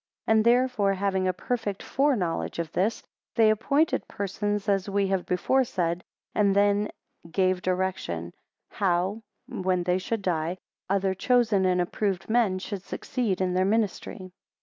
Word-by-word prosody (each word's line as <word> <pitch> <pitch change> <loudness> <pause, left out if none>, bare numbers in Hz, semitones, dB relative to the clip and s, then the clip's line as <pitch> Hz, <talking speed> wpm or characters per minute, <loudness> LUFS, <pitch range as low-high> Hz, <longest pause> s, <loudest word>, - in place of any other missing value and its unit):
17 220 - +3
And 215 - +1
therefore 240 -4 +3
having 190 -1 0
a - - +3
perfect 210 0 -3
fore 280 +1 +2
knowledge 175 -6 -2
of 170 -2 -3
this, 205 +5 0 0.3
they 220 -1 +5
appointed 280 +9 +1
persons, 205 +1 -2
as 195 -1 +1
we 200 0 +1
have 190 -2 -1
before 260 +9 +2
said, 175 -6 -2 0.3
and 200 -2 +3
then 205 +1 +3 0.3
a - - -13
gave 185 +1 +1
direction, 185 - -2 0.4
how, 190 +3 0 0.3
when 185 -1 -1
they 180 +1 +1
should 210 +2 -3
die, 170 0 -1 0.3
other 195 -1 +1
chosen 220 -2 +2
and 180 -1 +2
approved 190 +2 -1
men 225 -5 +3
should 195 +1 -5
succeed 215 -1 -2
in 185 -1 +1
their 185 +1 +2
ministry. 200 -2 -1
195 Hz, 155 wpm, -27 LUFS, 185-215 Hz, 0.4 s, they